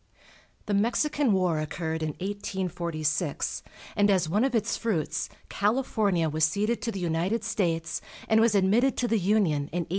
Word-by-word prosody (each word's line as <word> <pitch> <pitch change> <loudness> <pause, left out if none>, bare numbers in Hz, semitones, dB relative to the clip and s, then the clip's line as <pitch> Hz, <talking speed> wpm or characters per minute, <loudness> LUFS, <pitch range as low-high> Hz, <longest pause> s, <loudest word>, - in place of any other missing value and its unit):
The 210 - -2
Mexican 245 +6 +2
War 180 -5 +2
occurred 160 +1 -3
in 155 -1 -2
1846, 175 -6 -2 0.3
and 205 0 +3
as 185 -4 +3
one 205 +8 +1
of 265 -2 +1
its 225 0 +1
fruits 195 -10 -2 0.2
California 205 -5 +1
was 155 +1 -1
ceded 210 +8 +1
to 230 +1 -2
the 195 - -5
United 180 +6 -1
States, 175 -7 -1 0.3
and 220 0 +4
was 225 -2 +3
admitted 215 +7 +3
to 245 - +1
the 225 -1 +2
Union 175 -7 +1
in 175 0 -1
1850. - - -27
195 Hz, 160 wpm, -27 LUFS, 165-220 Hz, 0.3 s, and